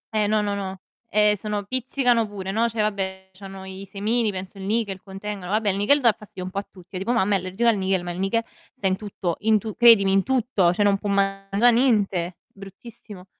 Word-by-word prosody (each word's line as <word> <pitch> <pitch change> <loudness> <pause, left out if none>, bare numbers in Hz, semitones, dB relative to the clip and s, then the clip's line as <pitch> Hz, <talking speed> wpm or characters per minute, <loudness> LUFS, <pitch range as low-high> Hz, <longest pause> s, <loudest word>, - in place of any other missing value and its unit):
Eh, 210 -1 +2
no, 215 0 +2
no, 205 -1 -1
no. 190 -1 -5 0.3
Eh, 210 0 +3
sono 210 0 -3
pizzicano 245 0 +1
pure, 195 -2 -6
no. 230 +3 +1
Cioè, 225 -1 -2
vabbè, 190 -2 -3
c'hanno 190 0 -10
i 190 +1 -8
semini, 215 +3 0
penso 190 +1 -8
il - - -7
nichel 205 -3 -1
contengano. 195 -1 -7
Vabbè, 215 -1 +1
il 195 - 0
nichel 280 +8 +3
dà 235 -3 +6
fastidio 195 -3 -10
un 185 - -6
po' 200 - -2
a 200 - -8
tutti. 180 -3 -17
Io 185 - -4
tipo 235 +6 -1
mamma 205 -3 +2
è - - +4
allergica 185 +6 -2
al 215 - +2
nichel, 190 -1 0
ma 175 - -4
il 175 - -6
nichel 230 +4 0 0.3
sta 195 - -8
in 190 0 +3
tutto, 190 -4 -4
in 220 0 +3
tu 215 -1 -5
credimi, 225 -5 +6
in 195 0 +4
tutto! 235 -7 +1
Cioè, 205 +3 +1
non 200 -1 +3
può 205 - -4
mangia' 195 +3 +2
niente. 205 -8 +1 0.2
Bruttissimo. 195 0 -12
200 Hz, 230 wpm, -23 LUFS, 190-220 Hz, 0.3 s, dà